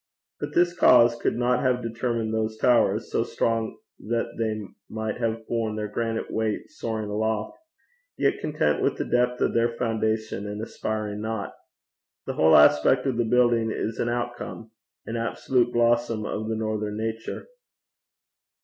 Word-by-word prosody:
But - - -5
this 175 0 +3
cause 120 -6 +6
could 120 - -1
not 125 +1 +2
have 125 -1 +1
determined 115 -1 -2
those 110 0 -1
towers, 125 +1 +2
so - - +1
strong 115 -1 -1 0.2
that 115 +1 -2
they 110 -1 -1 0.3
might 110 -1 -3
have 115 -1 -2
borne 115 -2 -1
their 105 -1 -3
granite 115 +1 -2
weight 110 -1 -2
soaring 110 -2 -4
aloft, 110 +1 -2 0.6
yet - - +1
content - - 0
with - - +1
the - - -2
depth 125 0 +1
of - - +2
their 115 0 +3
foundation, 110 -3 -1
and 105 0 -5
aspiring 110 -1 -4
not. 110 -2 -3 0.7
The - - -3
whole 80 0 +6
aspect 75 - +5
of 130 -4 0
the 120 - +2
building 120 -1 +3
is 110 +1 -3
an 120 - 0
outcome, 120 -2 -4 0.3
an 115 - -4
absolute 120 +1 0
blossom 120 -2 +2
of 110 +1 -3
the 110 - -1
northern 110 -1 -2
nature. 115 0 -4
115 Hz, 155 wpm, -25 LUFS, 110-120 Hz, 0.7 s, cause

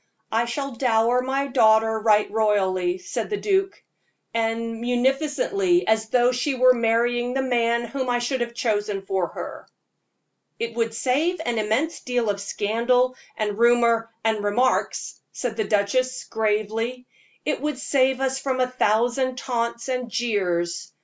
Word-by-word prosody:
"I 230 +2 +2
shall 275 +4 -3
dower 235 0 +2
my 270 +2 -1
daughter 220 -4 +3
right 215 -1 +3
royally," 190 -4 +1
said 185 - -4
the 415 - -1
duke 390 -1 0 0.5
"as 225 0 0
munificently 270 - 0
as 220 0 +1
though 245 +1 +3
she 255 +3 -1
were 255 0 +6
marrying 240 +1 +1
the 270 - +1
man 235 -2 +1
whom 255 +2 -3
I 245 - +2
should 240 +1 -2
have 235 0 -3
chosen 205 -4 -1
for 190 -2 0
her." - - -8 0.9
"It 230 0 -3
would 225 -1 -1
save 300 +9 0
an 235 -2 0
immense 255 +10 0
deal 245 -4 0
of 200 0 -6
scandal, 240 +5 +1 0.2
and 210 -1 -2
rumor, 235 -1 +3
and 220 -2 0
remarks," 240 +6 0
said 245 -3 -3
the 220 -1 -1
duchess, 250 +6 0
gravely; 220 +3 -2 0.4
"it - - -1
would 300 -2 -2
save 265 -1 +1
us 265 0 0
from 265 -1 -2
a 255 - +4
thousand 245 +2 +1
taunts 235 -2 -2
and 250 -2 -2
jeers. 180 -7 -1
235 Hz, 150 wpm, -23 LUFS, 220-255 Hz, 0.9 s, were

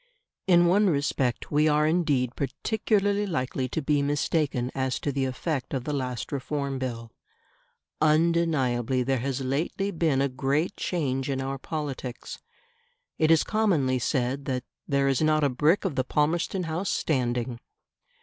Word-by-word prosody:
In 175 -2 +6
one 195 +3 +4
respect 140 -5 -1
we 150 +1 +3
are 150 0 +3
indeed 150 -7 +1
particularly 205 - 0
likely 130 -5 -2
to 160 - -3
be 145 0 +2
mistaken 140 -3 0
as 130 -1 -1
to 145 - -1
the 135 -1 -1
effect 135 +1 -3
of 130 - -2
the 150 - -3
last 125 -3 -3
Reform 140 0 -3
Bill. 115 -3 -5 0.9
Undeniably 150 -6 +2
there 135 0 0
has 135 +1 -2
lately 155 +9 -1
been 160 -6 +1
a 140 - +2
great 140 +7 -1
change 135 -6 -2
in 135 -1 -1
our 135 +1 -3
politics. 135 -5 -5 0.8
It 155 - +3
is 165 -1 +5
commonly 165 - +1
said 130 +2 -1
that 130 -2 -2 0.2
"there 140 -1 +2
is 135 0 +1
not 155 -1 +3
a 145 - +4
brick 150 +10 +2
of 185 - 0
the 130 - 0
Palmerston 160 +7 0
House 165 +4 -2
standing". 120 -4 -1
140 Hz, 150 wpm, -26 LUFS, 130-160 Hz, 0.9 s, In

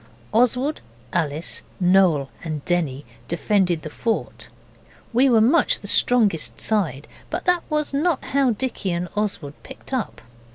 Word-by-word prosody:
Oswald, 250 +6 +2 0.3
Alice, 155 -1 -2 0.2
Noel 180 -7 +3
and 155 -3 -5
Denny 150 -6 -1 0.2
defended 175 -1 +1
the 155 - -7
fort. 225 +6 -3 0.6
We 260 +4 +4
were 230 -3 +5
much 260 +10 +3
the - - -10
strongest 215 -10 +2
side, 165 - -1 0.2
but - - -4
that 355 -2 +3
was 300 -1 0 0.3
how 275 -1 +1
Dicky 230 -3 -2
and 175 +1 -3
Oswald 195 -9 -2
picked 265 +1 -11
up. 255 -5 -3
200 Hz, 130 wpm, -22 LUFS, 165-250 Hz, 0.6 s, were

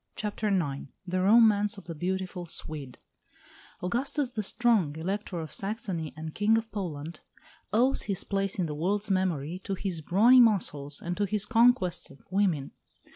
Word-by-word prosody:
CHAPTER 210 +1 -3
IX 165 -10 -1 0.2
THE 185 0 -1
ROMANCE 210 0 +5
OF 195 - -10
THE 170 - -7
BEAUTIFUL 180 +2 -3
SWEDE 145 -5 -5 0.9
Augustus 260 +7 0
the 220 - -2
Strong, 210 -7 +1
Elector 185 +2 -3
of 160 -1 -6
Saxony 195 -6 -3
and 155 0 -6
King 215 +2 +3
of 225 0 -4
Poland, 170 -5 -5 0.5
owes 250 +5 +3
his 195 -2 -2
place 195 0 -1
in 185 - 0
the 155 - -4
world's 195 +7 -1
memory 180 -3 0
to 195 0 -4
his 185 -4 -3
brawny 220 +11 +5
muscles 150 - +2
and 175 +1 -2
to 205 - +1
his 210 0 0
conquest 225 -5 +3
of 140 - -17
women. 180 -8 +1
190 Hz, 160 wpm, -28 LUFS, 165-210 Hz, 0.9 s, ROMANCE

